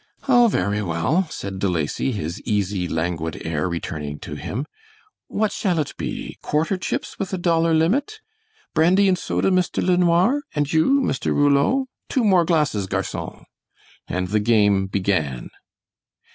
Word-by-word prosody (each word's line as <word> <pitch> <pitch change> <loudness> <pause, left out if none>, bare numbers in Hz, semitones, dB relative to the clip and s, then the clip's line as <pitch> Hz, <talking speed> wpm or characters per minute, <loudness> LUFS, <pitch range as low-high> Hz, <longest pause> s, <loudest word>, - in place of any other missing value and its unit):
"Oh, 245 -3 +6
very 105 - 0
well," 95 - 0
said 95 -8 -6
De 100 - +1
Lacy, 85 - -1
his 85 -4 -4
easy, 100 -4 -1
languid 80 -1 -2
air 80 +2 -1
returning 75 -3 -4
to - - -7
him. 125 +7 -4 0.6
"What 215 0 0
shall 180 -5 0
it 150 -3 -2
be - - -5
quarter 160 +6 0
chips 185 - -4
with 195 -1 -3
a - - 0
dollar 165 -2 +2
limit? 270 - +1 0.5
Brandy 180 +5 +4
and 185 - +4
soda, 185 - 0
Mr. 185 -1 +1
LeNoir? 180 +8 +3
And 145 0 0
you, 265 - +4
Mr. 135 - -2
Rouleau? 145 - +3 0.2
Two 260 - +1
more 185 -5 +4
glasses, 150 - +1
garcon," - - -4 0.6
and 90 0 -2
the 105 +2 +2
game 105 -3 +3
began. 90 -10 -1
145 Hz, 145 wpm, -22 LUFS, -, 0.6 s, Oh